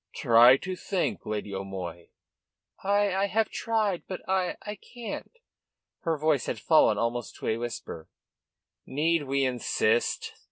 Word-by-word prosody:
"Try 120 +3 +7
to 185 +5 -5
think, 185 0 -2
Lady 105 -1 -3
O'Moy." 95 -3 -6 0.8
"I 200 0 +2
I 195 +1 +2
have 220 +3 0
tried. 215 -5 0
But 185 - -7
I 185 -1 0
I 210 - -4
can't." 235 +3 -8 0.7
Her 165 -2 -1
voice 150 -2 +1
had - - -2
fallen 155 -10 +4
almost 115 +1 -2
to - - -6
a 110 - +1
whisper. 115 -8 -6 0.8
"Need 155 +2 +1
we 135 0 +1
insist?" 120 -2 0
145 Hz, 135 wpm, -28 LUFS, 115-190 Hz, 0.8 s, Try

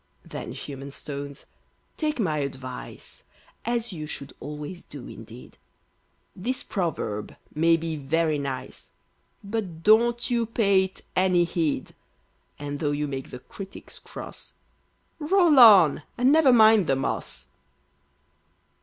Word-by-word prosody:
Then, 120 - -7
human 135 +1 -7
stones, 140 0 -7 0.5
take 305 -3 -2
my 160 -8 +1
advice, 130 -2 -7 0.4
(As 235 -2 -1
you 155 -3 -6
should 140 -2 -7
always 150 +4 -7
do, - - -10
indeed); - - -12 0.8
This 240 +7 -3
proverb 135 - -3 0.2
may 165 +2 +4
be 165 -1 -4
very 155 +2 0
nice, 135 -2 -6 0.5
But 200 -6 -4
don't 235 +3 +4
you 235 -2 +1
pay 200 -4 +3
it 190 - -11
any 185 -1 +4
heed, 165 -3 -1 0.6
And, 145 0 -5
tho' 150 - 0
you 145 +1 -1
make 135 -2 -5
the - - -7
critics 195 +9 -10
cross, - - -9 0.7
Roll 330 -2 +4
on, 200 - +8 0.2
and 250 +2 +4
never 305 -3 +6
mind 220 -5 +6
the 135 - +3
moss. 65 - -3
165 Hz, 125 wpm, -26 LUFS, 145-225 Hz, 0.8 s, on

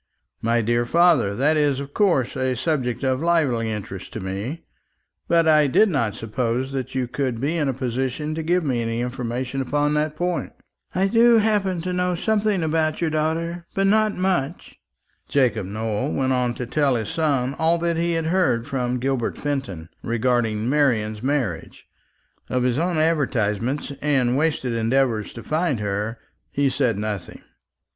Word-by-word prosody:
"My 115 +1 +2
dear 120 +2 +1
father, 150 - +3
that 145 +6 +2
is 145 -3 +2
of 140 0 -7
course 175 - +2
a 130 -1 0
subject 130 -2 -1
of 130 0 +1
lively 145 -10 +1
interest 95 -3 -6
to - - -4
me; 100 - -5 0.6
but 165 -1 +3
I 155 -2 +5
did 215 +10 +4
not 115 - 0
suppose 120 +3 -2
that 135 -1 -4
you 130 -2 0
could 125 -2 -2
be 145 +6 -1
in 155 -4 0
a - - 0
position 130 +4 -2
to 160 - -3
give 175 +3 +1
me 130 -5 0
any 115 0 -2
information 125 +1 -3
upon 145 +3 0
that 150 0 0
point." 175 +2 -2 0.4
"I 190 +1 +2
do 230 +3 +5
happen 205 -5 +1
to 180 0 -2
know 180 0 0
something 210 -1 +1
about 155 0 0
your 165 -2 0
daughter, 165 +2 -2
but 195 - +2
not 215 +1 +3
much." 180 -5 -2 0.5
Jacob 115 -8 +1
Nowell 110 +5 -2
went 130 -1 +1
on 125 -1 0
to 125 - -4
tell 140 +1 +1
his 110 -3 -2
son 140 -5 0
all 165 +1 +3
that 170 0 0
he 170 +1 +1
had 165 -1 -1
heard 160 -9 +1
from 125 -2 -1
Gilbert 130 -1 -1
Fenton 135 - -3
respecting 115 -2 0
Marian's 115 -7 +1
marriage. 130 - -2 0.6
Of 125 -1 0
his 125 +2 +1
own 175 0 0
advertisements, 135 -5 0
and 130 -4 +2
wasted 145 -4 0
endeavours 115 -1 +1
to 115 - -9
find 155 -5 0
her, 105 +3 -2 0.3
he 140 -1 +1
said 125 -5 +1
nothing. 105 -4 -5
135 Hz, 165 wpm, -23 LUFS, 120-160 Hz, 0.6 s, I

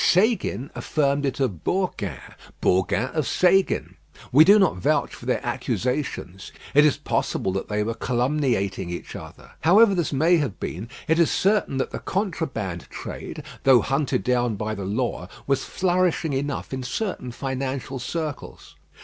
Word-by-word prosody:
Séguin 185 - +2
affirmed 140 -1 0
it 135 - -3
of 110 - -1
Bourgain, 115 - -2 0.3
Bourgain 95 +7 +1
of 155 -3 0
Séguin. 190 +1 +2 0.4
We 145 +5 +8
do 200 +5 +7
not 190 - +3
vouch 90 - +1
for - - -10
their - - 0
accusations; 125 -7 -3 0.2
it 150 +1 +7
is 145 - +1
possible 95 - -1
that 95 +1 -3
they 105 0 0
were 115 +2 -2
calumniating 120 - 0
each 85 - -6
other. - - -11
However 200 +5 +6
this 175 -4 0
may 160 +5 +4
have 140 - -2
been, 105 +7 -5 0.2
it 160 +1 +3
is 170 - +4
certain 195 -8 +1
that 130 - -1
the - - -4
contraband 140 - -3
trade, - - -7 0.2
though 130 -3 +6
hunted 135 +4 0
down 125 -3 +1
by 110 +2 -3
the 100 -2 -5
law, 105 -2 -2 0.2
was 135 -1 0
flourishing 180 -4 +1
enough 140 0 -3
in 130 - -3
certain 125 - -3
financial 130 +1 -4
circles. 155 +2 -5
135 Hz, 155 wpm, -24 LUFS, 115-165 Hz, 0.4 s, We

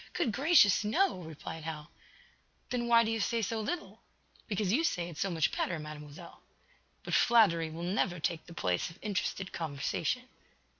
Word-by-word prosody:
"Good 230 - 0
gracious, 270 - +5
no!" 280 - +2
replied 160 -1 -8
Hal. 155 -2 -6 0.8
"Then 240 -1 -1
why 230 -1 +6
do 225 - -1
you 225 - -1
say 230 +2 0
so 220 +2 -1
little?" 340 +10 -4 0.5
"Because 205 -2 0
you 305 +7 +3
say 175 - 0
it 165 - -10
so 195 - 0
much 165 -3 0
better, 175 - -1
Mademoiselle." 150 -1 -10 0.6
"But - - -5
flattery 200 -9 +4
will 165 +2 -7
never 180 -1 0
take 160 +1 -2
the 170 - -11
place 90 - 0
of 165 - -14
interested 195 -2 -2
conversation." 160 - -2
185 Hz, 165 wpm, -31 LUFS, 160-225 Hz, 0.8 s, why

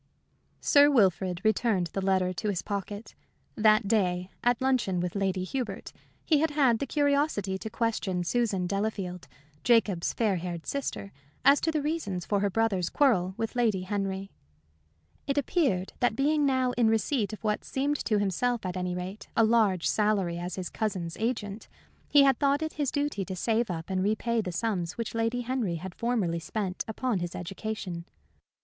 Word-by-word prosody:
Sir 290 -1 +6
Wilfrid 185 - +2
returned 215 -6 +1
the 195 - -1
letter 190 -1 +1
to 210 +4 -2
his 190 -4 -2
pocket. 205 +1 -5 0.4
That 215 -1 +4
day, 185 -4 +1
at 245 -1 +3
luncheon 255 -9 +1
with 175 0 -2
Lady 190 -2 0
Hubert, 250 +6 -4 0.3
he 305 -3 +4
had 320 +2 +2
had 270 -6 +3
the 280 - -2
curiosity 285 -10 +1
to 220 - -5
question 215 -5 -1
Susan 200 -2 0
Delafield, 195 -2 -3 0.4
Jacob's 215 -7 +3
fair 210 -5 +1
haired 170 -1 -5
sister, 270 -7 -4 0.3
as 280 +1 +6
to 325 - +1
the 305 -2 -1
reasons 225 - -2
for 205 - +1
her 200 0 +1
brother's 195 -4 +1
quarrel 190 -11 +2
with 225 +2 -3
Lady 225 -6 +2
Henry. 195 0 -3 1.0
It 280 0 -1
appeared 270 - +1
that 245 -3 +2
being 290 +3 +2
now 260 -2 +2
in 245 -2 +2
receipt 220 +1 +1
of 215 - -9
what 210 -1 0
seemed 285 +2 -1
to 215 - +2
himself, 205 +4 0
at 180 0 -3
any 180 -1 -2
rate, 185 +3 -6
a 225 - +6
large 215 -6 +3
salary 200 -5 +1
as 175 0 -4
his 185 -2 -5
cousin's 185 -7 -3
agent, 220 -2 -3 0.4
he 285 -1 +7
had 270 -1 +4
thought 285 +1 +2
it 315 - -3
his 290 -3 -1
duty 285 -8 -1
to 190 0 -5
save 225 +4 0
up 165 +1 -5
and 185 0 0
repay 225 +3 +1
the 185 -4 -4
sums 180 -3 -2
which 230 -1 -4
Lady 230 +2 0
Henry 240 -7 -1
had 180 +2 -6
formerly 210 -8 0
spent 185 +2 -3
upon 225 -1 -1
his 175 0 -4
education. 185 -1 -5
215 Hz, 175 wpm, -28 LUFS, 185-245 Hz, 1.0 s, he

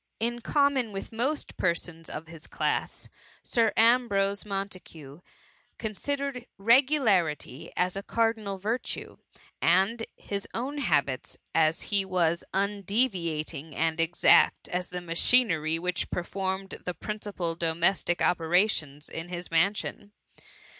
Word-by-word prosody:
In 240 +2 -1
common 280 -4 +2
with 195 -1 -6
most 260 +7 -2
persons 170 -1 -2
of 160 +2 -6
his 165 0 -10
class. - - -2 0.4
Sir 225 -3 +2
Ambrose 220 -4 +3
Montagu 185 -7 -6 0.6
considered 255 +4 -3
regularity 210 - +2
as 180 +1 +1
a 195 - -3
cardinal 220 -2 0
virtue; 220 +6 -3 0.4
and 190 +7 +3
in - - -4
his 200 -1 -5
own 275 +5 -3
habits, 145 - 0 0.5
he 200 -2 0
was 170 -3 +1
as - - -19
undeviating 185 - -1
and 165 +1 0
exact 165 +1 +4
as 180 0 -2
the 180 0 -5
machinery 165 -2 +2
which 180 +1 -2
performed 190 +2 -3
the 180 - -4
principal 205 -3 -4
domestic 170 +2 +1
opera 175 +4 +4
tions 150 -7 -5
in 165 +2 -6
his 175 -1 -6
mansion. 200 +4 0
190 Hz, 120 wpm, -28 LUFS, 165-225 Hz, 0.6 s, exact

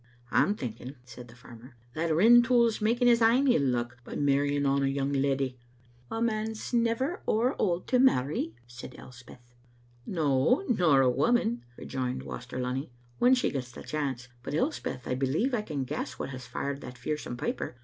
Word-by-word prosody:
*' - - -31
"I'm 205 - +3
thinking," 125 - -7
said 125 0 -11
the 115 - -15
farmer, 125 +1 -14 0.2
"that 160 +2 -1
Rintoul's 235 +5 +5
making 240 +3 +2
his 235 -1 +5
ain 240 +5 +4
ill 245 - +4
luck 120 -2 -2
by - - -8
marrying 145 0 +1
on 140 0 +2
a 135 - +2
young 135 +1 -1
leddy." 135 -2 0 0.5
"A 225 - -3
man's 220 0 -2
never 235 +7 0
ower 240 +5 +2
auld 180 -2 0
to 250 - +3
marry," 140 - +2
said 120 +1 -10
Elspeth. 125 -1 -14 0.5
"No, 160 - +2
nor 175 - +4
a 130 - +4
woman," 120 - +1
rejoined 130 0 -4
Waster 125 +1 -7
Lunny, 125 +3 -3 0.3
"when 250 +2 +5
she 250 - 0
gets 125 -3 -4
the - - -10
chance. 135 -5 -3
But, 140 - -5
Elspeth, 210 - -2
I - - -1
believe 135 - 0
I 230 - +1
can 150 -9 -4
g^ess - - -4
what - - -6
has 130 -1 -8
fired 140 +3 -4
that 125 0 -9
fearsome 135 -2 -4
piper. 125 - -3
140 Hz, 180 wpm, -28 LUFS, -, 0.5 s, Rintoul's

